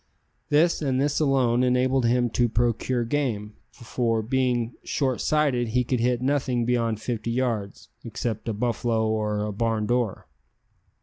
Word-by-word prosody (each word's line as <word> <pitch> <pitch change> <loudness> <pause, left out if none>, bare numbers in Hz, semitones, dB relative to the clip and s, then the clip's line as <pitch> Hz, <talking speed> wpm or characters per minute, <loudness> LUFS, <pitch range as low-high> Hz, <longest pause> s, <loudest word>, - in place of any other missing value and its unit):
This, 165 +4 +3
and 130 -3 0
this 145 +1 +1
alone, 130 -5 +2
enabled 130 0 +2
him 120 0 +2
to 120 0 +2
procure 120 +2 0
game, 115 -5 -2 0.2
for, 115 -2 -2
being 125 -1 0
short 130 -4 -1
sighted, 140 -6 +1
he 125 +3 +1
could 125 0 -1
hit 125 +1 +1
nothing 130 -3 0
beyond 115 -3 0
fifty 115 -1 -3
yards, 115 -5 -2
except 115 -1 -4
a - - -1
buffalo 115 0 0
or 105 -1 -1
a 105 - -4
barn 110 0 0
door. 120 -3 -1
120 Hz, 145 wpm, -25 LUFS, 115-130 Hz, 0.2 s, This